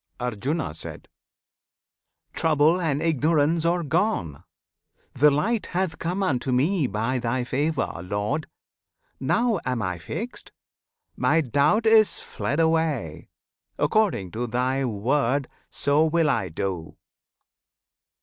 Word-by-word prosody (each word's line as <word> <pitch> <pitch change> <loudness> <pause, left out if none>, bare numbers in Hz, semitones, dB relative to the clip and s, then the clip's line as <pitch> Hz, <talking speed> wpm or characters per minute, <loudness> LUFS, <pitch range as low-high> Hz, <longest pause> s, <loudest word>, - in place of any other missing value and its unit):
Arjuna. 125 - -2 1.6
Trouble 160 +3 +3
and 150 -3 0
ignorance 160 +1 +2
are 170 +1 +1
gone! 155 - -1 0.7
the 150 +3 +5
Light 200 +11 0
Hath 185 -2 -2
come 180 +4 -2
unto 130 -7 0
me, 145 +5 +2
by 115 +5 -1
Thy 125 +1 -1
favour, 140 - -1
Lord! 105 - -2 0.7
Now 235 -5 +1
am 125 -3 -2
I 90 -2 -3
fixed! 220 - -6 0.6
my 165 - +2
doubt 145 - +2
is 220 -1 +5
fled 145 - -3
away! 160 - 0 0.5
According 150 - +1
to 120 +2 -3
Thy 130 +3 0
word, 130 +4 0 0.2
so 145 +3 +2
will 160 -1 +2
I 95 -8 -1
do! 85 0 -4
145 Hz, 110 wpm, -25 LUFS, 120-165 Hz, 1.6 s, the